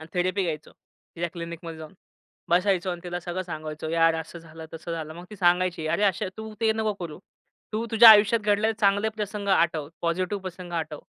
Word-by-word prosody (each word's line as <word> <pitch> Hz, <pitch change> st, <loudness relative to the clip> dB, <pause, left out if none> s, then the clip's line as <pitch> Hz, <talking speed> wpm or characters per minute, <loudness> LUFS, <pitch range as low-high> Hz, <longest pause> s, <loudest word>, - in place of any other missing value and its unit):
आणि 160 Hz, -, -10 dB
थेरपी 185 Hz, +2 st, +1 dB
घ्यायचो. 155 Hz, -3 st, -4 dB, 0.5 s
तिच्या 170 Hz, +1 st, -2 dB
क्लिनिकमध्ये 170 Hz, -1 st, -7 dB
जाऊन 155 Hz, +1 st, -10 dB, 0.6 s
बसायचो 185 Hz, +1 st, +2 dB
अन् 175 Hz, -1 st, -5 dB
तिला 175 Hz, 0 st, -3 dB
सगळं 175 Hz, +2 st, -4 dB
सांगायचो, 155 Hz, -2 st, -6 dB
"यार, 165 Hz, 0 st, +3 dB
असं 160 Hz, +1 st, -6 dB
झालं, 160 Hz, 0 st, -11 dB
तसं 165 Hz, +1 st, -6 dB
झालं." 160 Hz, -1 st, -5 dB
मग 175 Hz, +1 st, -10 dB
ती 210 Hz, -, -9 dB
सांगायची, 180 Hz, -2 st, +2 dB
"अरे, 180 Hz, +6 st, 0 dB
अशा 190 Hz, -1 st, +1 dB
तू 220 Hz, 0 st, -7 dB
ते 220 Hz, -1 st, +3 dB
नको 220 Hz, -1 st, -1 dB
करू. 165 Hz, -4 st, -6 dB, 0.5 s
तू 220 Hz, +2 st, -1 dB
तुझ्या 230 Hz, +1 st, +9 dB
आयुष्यात 215 Hz, +2 st, +6 dB
घडलेले 210 Hz, +1 st, +2 dB
चांगले 200 Hz, +1 st, +3 dB
प्रसंग 210 Hz, -2 st, -5 dB
आठव. 165 Hz, -6 st, +2 dB
पॉझिटिव्ह 185 Hz, +4 st, -1 dB
प्रसंग 180 Hz, -1 st, -8 dB
आठवं. 155 Hz, -3 st, -3 dB
175 Hz, 190 wpm, -26 LUFS, 165-200 Hz, 0.6 s, तुझ्या